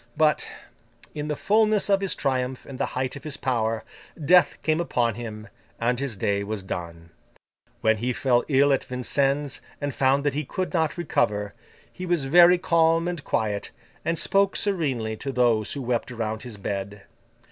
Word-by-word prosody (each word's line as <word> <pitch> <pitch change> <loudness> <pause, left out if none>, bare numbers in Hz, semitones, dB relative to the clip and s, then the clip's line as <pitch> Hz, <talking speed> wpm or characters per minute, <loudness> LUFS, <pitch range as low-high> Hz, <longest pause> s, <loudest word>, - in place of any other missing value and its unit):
But, 155 -1 +2 0.6
in 150 -1 -4
the 150 - -1
fulness 215 +3 +2
of 195 -1 +3
his 195 - -1
triumph 130 -2 -2
and 135 -2 -9
the - - 0
height 130 +1 -1
of 140 - -9
his 150 -3 -5
power, 115 -3 -1 0.4
Death 175 +4 +4
came 155 +1 +1
upon 120 -8 0
him, 110 -1 -7 0.3
and 120 +1 +1
his 135 -5 -3
day 100 +1 0
was 105 -1 -4
done. 85 -2 -6 0.7
When 110 0 +3
he 120 +4 -1
fell 125 0 +2
ill 140 0 +4
at 135 - 0
Vincennes, 135 +2 -1 0.2
and 145 -1 -3
found 135 +2 +2
that 145 -2 +1
he 150 +2 -1
could 185 +7 -4
not 160 -2 0
recover, 105 -11 0 0.4
he 185 - -6
was 170 -5 +1
very 175 +5 +7
calm 165 -2 +2
and 175 -4 -4
quiet, 105 -2 -1 0.3
and 165 0 -1
spoke 195 +3 +3
serenely 135 - -1
to 135 - -4
those 120 -4 +2
who 140 - -5
wept 120 0 -1
around 110 -2 -3
his 120 -4 -8
bed. 100 0 -5
135 Hz, 175 wpm, -25 LUFS, 110-160 Hz, 0.7 s, very